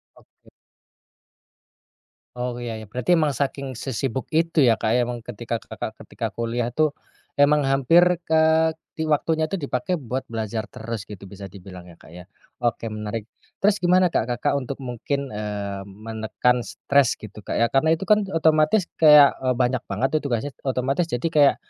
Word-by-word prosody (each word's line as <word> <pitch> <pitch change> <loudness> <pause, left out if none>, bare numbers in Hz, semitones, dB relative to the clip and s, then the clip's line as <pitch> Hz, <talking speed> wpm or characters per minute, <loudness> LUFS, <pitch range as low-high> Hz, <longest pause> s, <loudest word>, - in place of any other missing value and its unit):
Oke. - - -26 1.9
Oh, 125 0 -4
ya 120 -2 -5
ya. - - -9
Berarti 125 +10 +1
emang 155 -4 +3
saking 135 -2 -3
sesibuk 130 0 -3
itu 165 0 +2
ya, 115 - +6
Kak, 110 - +1
emang 120 -1 -1
ketika 115 -1 -5
Kakak - - -6
ketika - - -5
kuliah 120 +1 -2
tuh, 155 +1 +3 0.5
emang 145 +1 +5
hampir, 135 +6 +5 0.3
eee, 160 0 +4 0.3
di 160 - -2
waktunya 160 +1 +1
tuh 195 - -1
dipakai 140 +5 -2
buat 130 +1 -4
belajar 110 -1 -3
terus, 110 -2 -6
gitu, 100 -2 -11
bisa 100 +1 -9
dibilang 95 -2 -11
ya, - - -15
Kak, - - -16
ya? 90 - -9 0.4
Oke, 115 -1 0
menarik. 105 +1 -5 0.3
Terus 205 +1 +3
gimana, 180 +1 +5
Kak, - - +1
Kakak 120 +4 0
untuk 135 +1 -6
mungkin, 135 +3 -3
eee, 100 -2 -4
menekan 110 +4 -1
stres 140 -3 +1
gitu, 110 0 -10
Kak, - - -4
ya, 115 - +4
karena 155 +4 +3
itu 165 - -7
kan 210 -1 +5
otomatis 160 +4 +3 0.2
kayak, 150 -3 +8
eee, 130 - +2
banyak 125 0 0
banget 135 - 0
itu - - +3
tugasnya. 120 +3 -2
Otomatis 135 +5 0
jadi 120 +7 -1
kayak 145 -2 +6
125 Hz, 165 wpm, -23 LUFS, 115-150 Hz, 1.9 s, kayak